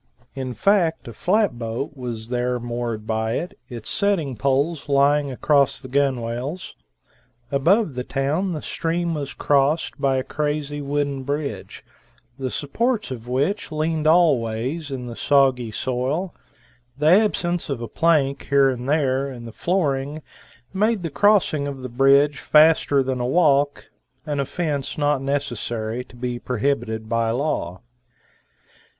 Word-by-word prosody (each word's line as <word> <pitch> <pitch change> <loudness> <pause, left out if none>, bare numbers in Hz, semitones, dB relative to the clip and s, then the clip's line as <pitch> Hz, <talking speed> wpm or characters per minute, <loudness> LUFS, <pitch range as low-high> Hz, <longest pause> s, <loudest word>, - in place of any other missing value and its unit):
In 130 -2 -5
fact 170 - +2
a 115 - -7
flat 190 - +1
boat 115 +5 -4
was 120 -4 -6
there 125 0 -1
moored 120 -2 -4
by 110 0 -1
it, 175 - -3
it's 120 -4 -7
setting 185 - 0
poles 140 +6 0
lying 140 +1 +3
across 140 +1 +2
the - - -9
gunwales. 130 +3 -2 0.8
Above 165 +6 +3
the 125 0 -3
town 150 +9 -1
the 155 - -5
stream 170 +1 -2
was 145 -3 -4
crossed 145 +1 +1
by 135 -2 +2
a 130 - -1
crazy 145 0 -2
wooden 140 -1 -1
bridge, 145 +2 -4 0.5
the 130 -1 -2
supports 215 - -1
of 120 -2 -7
which 145 +11 -1
leaned 155 0 -1
all 165 -5 +5
ways 120 +8 -3
in 130 -2 -5
the 120 -1 -7
soggy 130 -4 +2
soil; 130 - -2 0.6
the 150 - -2
absence 175 -2 +3
of 135 -4 -2
a 120 - -5
plank 145 +1 +1
here 140 -1 +5
and 125 +1 -5
there 140 -2 +1
in 120 -2 -9
the 115 - -8
flooring 150 - -1 0.5
made 210 0 +1
the 165 - -3
crossing 190 -7 +3
of 135 -2 -6
the 130 - -5
bridge 140 +4 +4
faster 150 -3 +4
than 130 -1 -2
a 120 - -1
walk 145 -1 +2 0.3
an 145 -2 -2
offense 145 0 -2
not 145 -2 +1
necessary 120 -4 -2
to 125 - -18
be 120 0 -4
prohibited 115 -3 -2
by 115 0 0
law. 115 - -2
140 Hz, 145 wpm, -22 LUFS, 125-155 Hz, 0.8 s, all